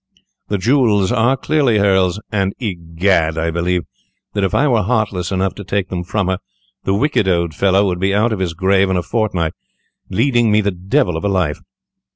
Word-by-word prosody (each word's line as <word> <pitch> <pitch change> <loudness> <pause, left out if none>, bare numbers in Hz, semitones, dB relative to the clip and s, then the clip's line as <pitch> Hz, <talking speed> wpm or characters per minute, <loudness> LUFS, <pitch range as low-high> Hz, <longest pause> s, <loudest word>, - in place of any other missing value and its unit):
The 105 - -1
jewels 105 -2 +2
are 125 +2 +2
clearly 135 -5 +1
hers, 95 -2 +2
and, 100 -2 -1
egad, 85 -5 0
I 80 +1 0
believe 85 +1 -1 0.5
that 100 - -1
if 95 - +1
I 150 - +3
were 120 -5 +2
heartless 105 -5 -1
enough 95 0 0
to 100 - -9
take 100 0 -2
them 90 -1 -3
from 100 +1 -2
her, 95 0 -1 0.5
the 95 - +1
wicked 130 -3 +1
old 85 -3 +1
fellow 100 +4 +2
would 90 -2 -1
be 95 +1 +1
out 110 +3 +2
of 105 - -4
his 90 -3 -2
grave 95 +2 +2
in 95 - +1
a 90 - -1
fortnight, 95 -8 -1 0.6
leading 120 +2 +2
me 105 - +4
the 100 0 0
devil 90 -1 0
of 80 - -4
a 100 - +1
life. 90 -7 0
95 Hz, 195 wpm, -17 LUFS, 90-105 Hz, 0.6 s, me